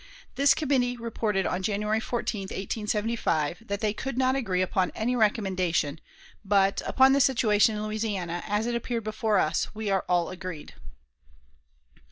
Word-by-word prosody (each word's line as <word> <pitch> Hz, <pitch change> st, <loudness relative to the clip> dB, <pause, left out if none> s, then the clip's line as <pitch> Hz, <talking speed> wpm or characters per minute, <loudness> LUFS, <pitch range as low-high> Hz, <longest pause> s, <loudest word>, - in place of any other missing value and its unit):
This 280 Hz, +1 st, +4 dB
committee 255 Hz, -5 st, 0 dB
reported 220 Hz, -4 st, -1 dB
on 180 Hz, -, -1 dB
January 210 Hz, +2 st, 0 dB
14, 220 Hz, -3 st, -3 dB
1875, 210 Hz, -3 st, -2 dB
that 200 Hz, 0 st, -3 dB
"they 215 Hz, -2 st, +1 dB
could 260 Hz, +3 st, -5 dB
not 260 Hz, 0 st, +2 dB
agree 190 Hz, -9 st, 0 dB
upon 185 Hz, 0 st, 0 dB
any 240 Hz, +3 st, 0 dB
recommendation; 185 Hz, -9 st, 0 dB, 0.4 s
but, 195 Hz, -1 st, +2 dB
upon 265 Hz, 0 st, +5 dB
the 280 Hz, -, +4 dB
situation 220 Hz, -4 st, +3 dB
in 210 Hz, 0 st, -3 dB
Louisiana, 205 Hz, -6 st, -3 dB
as 210 Hz, +1 st, 0 dB
it 240 Hz, -, -1 dB
appeared 235 Hz, -1 st, -2 dB
before 215 Hz, 0 st, 0 dB
us, 155 Hz, -, 0 dB
we 215 Hz, -2 st, -2 dB
are 190 Hz, -1 st, +1 dB
all 175 Hz, -1 st, +2 dB
agreed." 185 Hz, -4 st, -7 dB
210 Hz, 150 wpm, -27 LUFS, 190-235 Hz, 0.4 s, upon